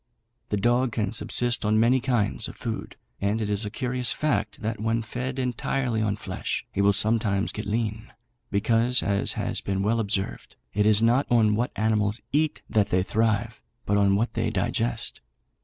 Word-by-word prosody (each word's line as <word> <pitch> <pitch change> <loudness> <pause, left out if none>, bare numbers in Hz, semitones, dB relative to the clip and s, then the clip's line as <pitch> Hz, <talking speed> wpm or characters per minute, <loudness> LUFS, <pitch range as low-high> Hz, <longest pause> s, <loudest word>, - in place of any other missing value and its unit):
The 105 - 0
dog 120 +3 +2
can 105 -3 -1
subsist 120 +1 0
on 110 +1 +3
many 120 +3 +4
kinds 115 -4 0
of - - -9
food, 115 -2 -5 0.3
and 100 +3 +1
it 105 -2 -2
is 105 +1 +3
a - - -3
curious 125 0 -1
fact, 135 -8 -1
that 110 0 -2
when 115 +1 0
fed 125 +4 -4
entirely 125 -1 -1
on 105 -2 0
flesh 95 -2 -4
he 100 - -1
will 100 0 +5
sometimes 105 -1 +1
get 105 - -6
lean; 110 +1 -2 0.4
because, 115 +4 +2
as 100 0 0
has - - -2
been 95 0 -1
well 115 +3 +1
observed, 100 -3 -2 0.2
it 105 0 +2
is 110 +1 +5
not 120 +5 +3
on 110 -3 +4
what 120 +4 0
animals 105 0 +1
eat 155 +1 0
that 105 -2 +1
they 90 0 +2
thrive, 110 +1 0 0.2
but 100 - +1
on 100 -1 +4
what 115 +4 0
they - - 0
digest. - - -2
110 Hz, 180 wpm, -26 LUFS, 105-120 Hz, 0.4 s, will